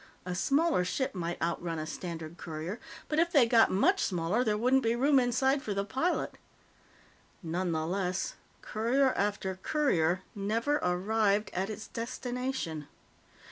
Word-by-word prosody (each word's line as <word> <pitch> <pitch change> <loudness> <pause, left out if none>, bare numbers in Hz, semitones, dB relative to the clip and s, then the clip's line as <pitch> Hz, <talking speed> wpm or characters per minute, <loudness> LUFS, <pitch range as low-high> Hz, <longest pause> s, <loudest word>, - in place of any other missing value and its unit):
A 180 - -3
smaller 285 - +2
ship 260 +8 -1
might 175 -2 -3
outrun 170 0 -2
a 155 - -3
standard 165 0 -6
courier, 165 +6 -5 0.3
but 305 - 0
if 340 +1 +3
they 280 -8 +6
got 230 -1 +5
much 370 - +3
smaller, 180 +6 +1
there 215 -3 +1
wouldn't 255 +4 +3
be 230 -1 +1
room 275 +3 +4
inside 265 +3 +2
for 205 -5 -3
the 200 0 0
pilot. 295 - -1 1.0
Nonetheless, 180 +2 -1 0.3
courier 255 +5 +2
after 195 -2 -1
courier 185 - +1
never 225 +8 0
arrived 205 +3 +1
at 190 +3 -1
its 215 0 -6
destination. 245 - -4
210 Hz, 140 wpm, -30 LUFS, 180-255 Hz, 1.0 s, they